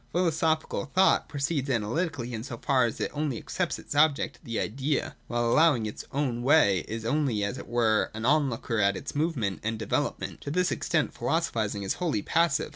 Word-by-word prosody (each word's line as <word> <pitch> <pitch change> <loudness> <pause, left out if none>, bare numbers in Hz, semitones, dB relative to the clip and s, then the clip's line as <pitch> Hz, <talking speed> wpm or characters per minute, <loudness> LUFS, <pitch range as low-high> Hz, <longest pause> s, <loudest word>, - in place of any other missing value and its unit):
Philosophical 160 -2 0
thought 185 +6 +3
proceeds 140 -1 -1
analytically, 125 - -1
in 110 -1 -4
so 125 -2 -6
far 130 0 +2
as 115 - -3
it - - -2
only 145 -4 -2
accepts 180 +7 -2
its - - -7
object, 145 -1 +2
the 115 -6 -3
Idea, 135 +5 -1
and - - -16
while 120 0 0
allowing 145 -3 +4
it - - -2
its - - -8
own 130 -4 -1
way, 120 - +4
is 115 0 -5
only, 125 -5 +1
as 100 +6 -2
it - - -9
were, 115 -2 +2
an 110 +1 -4
on 145 +1 +3
looker 115 -1 -3
at 100 -1 +3
its 140 - -6
movement 145 - -1
and 110 +1 -2
development. 110 -2 -2
To - - -6
this 180 +4 +1
extent 155 -3 0
philosophising 110 -11 -1
is 95 - 0
wholly 155 - 0
passive. 165 -3 +1
135 Hz, 200 wpm, -28 LUFS, 115-155 Hz, -, allowing